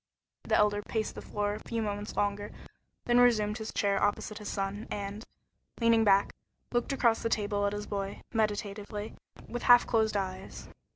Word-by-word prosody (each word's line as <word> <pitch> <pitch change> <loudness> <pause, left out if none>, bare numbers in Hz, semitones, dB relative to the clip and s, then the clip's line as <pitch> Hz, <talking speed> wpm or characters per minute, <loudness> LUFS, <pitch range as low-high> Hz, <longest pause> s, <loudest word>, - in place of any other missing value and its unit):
The - - +2
Elder 205 0 +3
paced 220 +1 -2
the - - -8
floor 205 0 -2
a 210 - -5
few 230 -1 -1
moments 205 0 -4
longer, 205 0 -1 0.5
then 240 0 +4
resumed 220 -3 +3
his 220 - -5
chair 200 -1 +1
opposite 205 +1 -1
his 210 - -6
son, 200 +2 -3
and, 205 +1 -4 0.6
leaning 230 -1 +4
back, 200 -1 +4 0.4
looked 240 +3 0
across 235 -4 +2
the 230 - -1
table 205 -2 0
at 200 - -2
his 205 0 -4
boy, 200 -1 -4
meditatively, 210 -1 -2 0.3
with 240 - -4
half 245 0 +7
closed 220 -2 +1
eyes. 190 -1 -5
210 Hz, 170 wpm, -30 LUFS, 205-225 Hz, 0.6 s, half